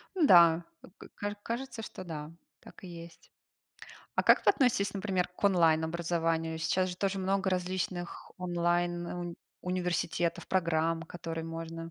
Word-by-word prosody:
Ну 340 -5 +4
да, 170 -4 +7 0.3
к - - -11
к - - -40
каж 205 0 -3
кажется, 235 +1 -4
что 190 - -8
да. 155 -3 -6 0.3
Так - - -15
и - - -7
есть. 170 -1 -11 0.8
А - - +2
как - - +5
вы - - +7
относитесь, 210 -7 +2
например, 190 -2 0
к 180 +3 -10
онлайн-образованию? 165 -2 +2
Сейчас 185 +3 +1
же 180 - -7
тоже 195 +1 -1
много 195 0 0
различных 180 -1 -3
онлайн 175 -1 0
ун 175 -1 -5 0.3
университетов, 175 -2 -1
программ, 165 -2 +1
которые 165 -1 -6
можно 165 0 -6
175 Hz, 145 wpm, -31 LUFS, 165-185 Hz, 0.8 s, да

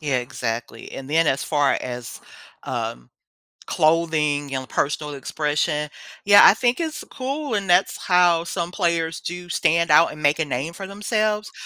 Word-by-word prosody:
Yeah, 145 -4 0
exactly, 120 -1 -5
and 135 0 -8
then 165 +1 +3
as 135 -2 0
far 145 -3 +1
as, 125 -1 -7 0.4
um, - - -5 0.6
clothing 155 -3 +1
and 130 -1 -4
personal 150 0 -2
expression, 150 +2 -2 0.3
yeah, 205 0 +7
I - - +8
think 245 +4 0
it's 315 -3 -4
cool, 275 -1 -4
and 200 -2 -2
that's 180 +2 +3
how 175 -2 +3
some 170 0 -4
players 170 -3 -1
do 175 0 -7
stand 170 0 +1
out 150 +2 +5
and 150 0 -11
make 145 0 +3
a 160 - +1
name 140 +3 -3
for 195 +3 -8
themselves, 210 +1 -2
165 Hz, 160 wpm, -22 LUFS, 145-190 Hz, 0.6 s, I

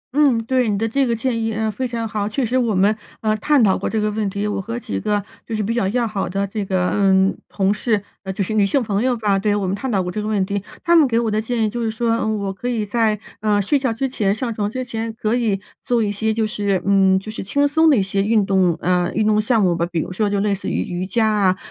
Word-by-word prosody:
嗯， 285 -5 +4
对， 255 -1 +1
你 205 - 0
的 225 +3 0
这 270 +4 +1
个 235 - +1
建 230 0 -1
议， 225 0 -1
呃， 220 0 -1
非 255 +5 -3
常 230 -1 -3
好。 210 -1 -2
确 250 +4 -1
实 240 +3 -2
我 230 -5 +1
们， 200 +3 +3 0.3
呃， 215 -1 +1
探 280 +4 +3
讨 195 -3 +4
过 - - -2
这 220 - -1
个 210 0 0
问 210 -1 -1
题， 200 +2 -3
我 205 - -2
和 230 +4 -5
几 100 - -4
个 205 - -1 0.2
就 225 - -3
是 215 - -1
比 220 +3 -1
较 235 -5 0
要 240 +4 0
好 200 -4 -3
的 195 +2 -1
这 205 +1 -4
个， 185 -2 0
嗯， 195 -1 +3
同 195 0 +1
事 210 -2 0 0.2
呃， 190 - -5
就 195 +1 -2
是 205 - -3
女 215 -1 +3
性 250 +7 +1
朋 205 -2 -1
友 250 0 +1
吧， 205 -3 +1
对， 205 +1 +1
我 205 -2 -1
们 185 +1 -1
探 255 +5 -4
讨 195 -4 +1
过 180 - -4
这 210 - -3
个 210 - -4
问 205 -3 +1
题。 200 +1 -2 0.2
她 345 -1 +4
们 315 -4 +6
给 230 -2 +1
我 230 -2 0
的 215 +1 +1
建 230 0 -1
议 - - +1
就 235 +3 -4
是 225 - 0
说， 230 +1 -1
嗯， 220 -1 -1
我 200 -1 -3
可 220 +6 -6
以 225 -4 -1
在， 215 0 +1 0.2
呃， 210 -1 +2
睡 240 +9 +2
觉 260 -3 0
之 240 +4 -1
前、 210 -7 0
上 235 +1 -3
床 205 -1 -2
之 255 +3 -4
前 225 -1 -4
可 215 -1 0
以 225 -5 +1 0.2
做 240 -2 +1
一 205 - 0
些 220 +2 -1
就 220 0 0
是 205 -3 -1
嗯， 195 -1 +4
就 215 +3 -8
是 220 - -6
轻 285 +9 +1
松 320 +3 +4
的 285 - +5
一 200 - +2
些 195 +1 -1
运 210 0 +2
动 185 -4 +2
呃， 180 -1 +1
运 215 - +2
动 215 0 +3
项 225 -1 +2
目 180 -2 +2
吧。 170 - -1
比 170 - -1
如 185 - -6
说 210 +2 0
就 200 0 0
类 205 0 +1
似 200 - -4
于 - - -1
瑜 180 +1 -4
伽 225 +2 +1
啊 200 -4 +2
215 Hz, 320 characters per minute, -20 LUFS, 195-230 Hz, 0.3 s, 们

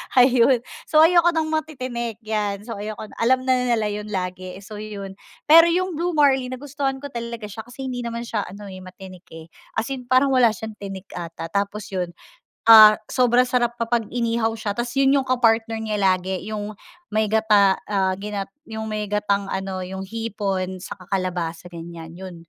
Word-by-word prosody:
ayun 250 -1 +5 0.2
so 310 0 +6
ayoko 345 0 +5
ng 315 -1 0
matitinik 255 -7 -3
yan, 210 -2 -2
so 225 -3 -7
ayoko 215 +1 -5
na 215 - -12
alam 255 +2 +3
na 260 0 +2
nila 220 -3 +1
yun 210 0 -5
lagi 185 -2 -4
eh, 195 - -13
so 210 0 -9
yun, 205 -2 -7 0.3
pero 330 +2 +8
yung 365 +2 +1
Blue 350 -1 -1
Marlin 265 -3 +3
nagustuhan 275 0 -4
ko 285 - -6
talaga 235 -2 -6
siya 220 +3 -8
kasi 245 +2 -9
hindi 245 - -4
naman 235 0 -4
siya 220 -3 -3
ano 200 +3 -10
eh, 185 - -9
matinik 185 0 -12
eh, 165 0 -12 0.2
as 225 +4 -2
in 255 -2 -5
parang 260 +2 +4
wala 240 -4 +4
siyang 220 +2 -7
tinik 195 -1 -8
ata 165 -1 -7
tapos 200 +2 -2
yun, 180 -3 -3 0.5
ah, 215 -1 +11 0.2
sobrang 250 0 +3
sarap 240 -2 +1
kapag 230 -1 0
inihaw 230 -2 0
siya 215 -2 -4
tapos 240 0 -2
yun 275 0 +4
yung - - -8
ka-partner 225 -2 +2
niya 215 -1 -2
lagi 190 -2 0
yung, 210 -1 -5 0.3
may 215 +1 +1
gata 210 -3 +4
ah, 190 -2 +1
ginat 200 -2 -4 0.2
yung 220 0 -5
may 210 -1 -3
gatang 200 -1 0
ano, 190 -1 -3
yung 190 +1 -6
hipon, 195 -4 -3
saka 180 -2 -9
kalabasa 175 -3 -2
ganyan 165 -1 -9
yun 185 0 -9
215 Hz, 185 wpm, -22 LUFS, 195-245 Hz, 0.5 s, ah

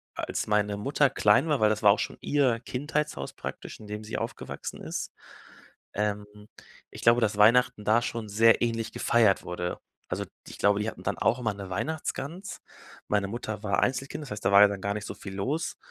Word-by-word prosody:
als - - -3
meine 105 -1 +1
Mutter 140 +5 +2
klein 105 +6 +4
war 150 -3 +1
weil 110 - +4
das 110 0 -1
war 100 - +8
auch 100 - +1
schon - - -3
ihr 130 -5 +2
Kindheitshaus 145 - -3
praktisch, - - -7
in 110 - -11
dem 105 +1 -6
sie 105 - -5
aufgewachsen - - -6
ist, - - -4 0.8
ähm, 105 0 -1 0.7
ich - - -10
glaube, 115 +1 +5
dass 105 -1 +1
Weihnachten 120 +1 +4
da 110 +2 +4
schon 115 -2 -4
sehr 115 +2 +5
ähnlich 115 -1 -1
gefeiert 110 -4 +3
wurde. 90 0 -4 0.3
Also, - - -3 0.2
ich - - -10
glaube, 100 0 +3
die 110 - -1
hatten - - -11
dann - - -2
auch 120 - +2
immer 110 -4 -1
'ne 100 -1 -8
Weihnachtsgans. 160 - -4 0.5
Meine 100 -1 +1
Mutter 110 -1 -5
war 100 - +1
Einzelkind, 135 +4 -1
das 135 - -10
heißt, 105 - -6
da - - +3
war 100 +1 +8
ja 105 - +9
dann 100 -1 -5
gar 100 +1 -1
nicht 105 0 -5
so - - -5
viel 95 -1 -8
los, 140 +12 -2
110 Hz, 205 wpm, -27 LUFS, 105-125 Hz, 0.8 s, ja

